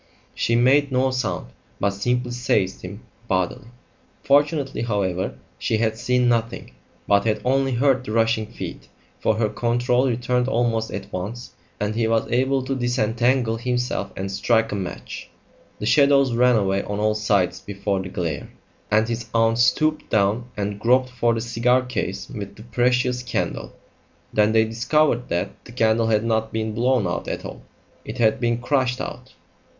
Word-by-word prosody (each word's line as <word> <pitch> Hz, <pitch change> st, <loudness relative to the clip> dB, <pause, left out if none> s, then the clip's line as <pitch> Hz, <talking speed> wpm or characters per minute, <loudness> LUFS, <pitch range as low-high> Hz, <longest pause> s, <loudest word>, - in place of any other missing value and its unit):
She 115 Hz, -, 0 dB
made 135 Hz, +4 st, +4 dB
no 130 Hz, +1 st, +2 dB
sound, 120 Hz, -, -3 dB, 0.3 s
but 100 Hz, -, +1 dB
simply 125 Hz, +5 st, -1 dB
seized 110 Hz, -6 st, 0 dB
him 100 Hz, +4 st, -9 dB, 0.2 s
bodily. 95 Hz, +6 st, -1 dB, 0.6 s
Fortunately, 145 Hz, 0 st, +2 dB
however, 100 Hz, -5 st, -1 dB, 0.2 s
she 110 Hz, -, 0 dB
had 110 Hz, 0 st, 0 dB
seen 125 Hz, +1 st, +1 dB
nothing, 115 Hz, -1 st, -1 dB, 0.4 s
but 100 Hz, 0 st, +3 dB
had 110 Hz, -1 st, +1 dB
only 135 Hz, +1 st, +2 dB
heard 130 Hz, +1 st, +2 dB
the 125 Hz, -, -6 dB
rushing 115 Hz, -1 st, +1 dB
feet, 115 Hz, -, -8 dB, 0.3 s
for 110 Hz, -, +1 dB
her 110 Hz, 0 st, +1 dB
control 120 Hz, +3 st, +1 dB
returned 125 Hz, +1 st, 0 dB
almost 115 Hz, -3 st, 0 dB
at -, -, -7 dB
once, 105 Hz, +7 st, -5 dB, 0.3 s
and 105 Hz, +1 st, -1 dB
he 115 Hz, 0 st, 0 dB
was 115 Hz, 0 st, +1 dB
able 130 Hz, +2 st, +2 dB
to 135 Hz, +1 st, -2 dB
disentangle 120 Hz, -1 st, +1 dB
himself 125 Hz, -4 st, -2 dB
and 95 Hz, 0 st, -3 dB
strike 115 Hz, +3 st, +1 dB
a -, -, -2 dB
match. 95 Hz, -3 st, -6 dB, 0.5 s
The -, -, -5 dB
shadows 140 Hz, -3 st, +4 dB
ran 125 Hz, +1 st, +4 dB
away 100 Hz, -2 st, +1 dB
on 100 Hz, 0 st, -4 dB
all 105 Hz, 0 st, +2 dB
sides 100 Hz, -5 st, +1 dB
before 100 Hz, -1 st, -2 dB
the 95 Hz, -, -6 dB
glare, 85 Hz, -7 st, -3 dB, 0.4 s
and 110 Hz, +1 st, +3 dB
his 120 Hz, 0 st, -4 dB
aunt 115 Hz, 0 st, +3 dB
stooped 155 Hz, +5 st, +2 dB
down 105 Hz, +3 st, +2 dB
and 100 Hz, 0 st, -3 dB
groped 130 Hz, +3 st, +3 dB
for 120 Hz, -2 st, +1 dB
the 115 Hz, -, -2 dB
cigar 125 Hz, +2 st, +2 dB
case 125 Hz, -4 st, -4 dB
with 100 Hz, -1 st, -7 dB
the 110 Hz, -, -12 dB
precious 125 Hz, +2 st, +1 dB
candle. 125 Hz, -, -3 dB, 0.6 s
Then 105 Hz, 0 st, +3 dB
they 110 Hz, 0 st, +4 dB
discovered 125 Hz, +4 st, +1 dB
that 85 Hz, +1 st, -3 dB
the -, -, -11 dB
candle 115 Hz, -1 st, +2 dB
had 110 Hz, -1 st, +2 dB
not 110 Hz, -1 st, 0 dB
been 110 Hz, -1 st, -2 dB
blown 120 Hz, -1 st, +2 dB
out 85 Hz, -, -3 dB
at -, -, -4 dB
all; -, -, -8 dB, 0.4 s
it -, -, -7 dB
had 110 Hz, -2 st, +3 dB
been 120 Hz, -1 st, +1 dB
crushed 125 Hz, 0 st, 0 dB
out. -, -, -7 dB
115 Hz, 165 wpm, -23 LUFS, 105-125 Hz, 0.6 s, made